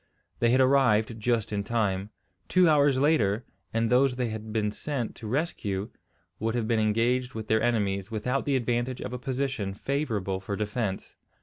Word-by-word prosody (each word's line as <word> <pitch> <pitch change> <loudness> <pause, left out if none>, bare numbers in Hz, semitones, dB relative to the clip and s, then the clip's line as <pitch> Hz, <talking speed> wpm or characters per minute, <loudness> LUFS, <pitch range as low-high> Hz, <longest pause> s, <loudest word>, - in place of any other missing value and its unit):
They 120 - +3
had 130 +2 +4
arrived 120 -4 +3
just 110 -1 0
in 100 -1 -1
time. 100 -3 -1 0.4
Two 185 -1 +4
hours 145 -3 +4
later, 120 -7 +2 0.3
and 115 0 +1
those 125 +1 +4
they 125 -2 -1
had 110 0 -6
been 105 -1 0
sent 125 0 -3
to 110 - -7
rescue 105 - -2 0.5
would 115 +2 -1
have 115 -2 -1
been 115 -1 +2
engaged 120 +4 +1
with 110 -1 -4
their 110 0 +2
enemies 100 -4 0
without 125 +5 -1
the 140 - +1
advantage 120 0 -1
of - - -5
a 125 - -4
position 130 -6 -2
favourable 105 -8 -2
for 100 +1 -4
defence. 105 -1 -3
115 Hz, 175 wpm, -27 LUFS, 105-130 Hz, 0.5 s, had